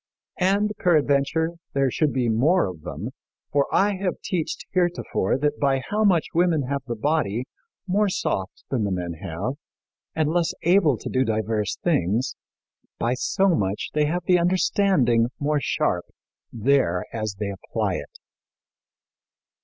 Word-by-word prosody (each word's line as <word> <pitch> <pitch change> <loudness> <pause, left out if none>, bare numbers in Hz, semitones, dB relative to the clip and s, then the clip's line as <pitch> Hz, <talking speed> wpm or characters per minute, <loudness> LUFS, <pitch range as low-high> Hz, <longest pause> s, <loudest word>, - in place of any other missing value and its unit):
And 200 +3 +2
peradventure, 155 -1 +2 0.2
there 135 -2 +2
should 150 +2 +1
be 125 -2 0
more 140 +12 +3
of 90 -5 -6
them, - - -5 0.4
for 140 -1 +2
I 200 0 +2
have 185 -1 -2
teached 170 -4 -3
heretofore 175 - 0
that 145 +1 -1
by 135 -2 +1
how 215 +1 +2
much 180 -6 +4
women 170 -3 +2
have 140 +2 -2
the 120 - -2
body 125 -2 0 0.4
more 200 +2 +2
soft 95 - -2
than 125 -5 +1
the 100 - 0
men 90 -2 -2
have, 100 - -4 0.6
and 155 -1 +1
less 170 -1 +1
able 170 - +4
to - - -8
do 130 - +1
divers 110 -2 -1
things, 120 - +1 0.6
by 120 +2 0
so 195 +9 +1
much 100 - 0
they 150 0 +2
have 175 +4 -1
the 180 -1 +4
understanding 170 - +3
more 150 +1 +1
sharp - - 0 0.5
there 115 -7 +1
as 110 -2 -3
they 100 0 -2
apply 95 - -2
it." - - -9
140 Hz, 145 wpm, -24 LUFS, 115-175 Hz, 0.6 s, much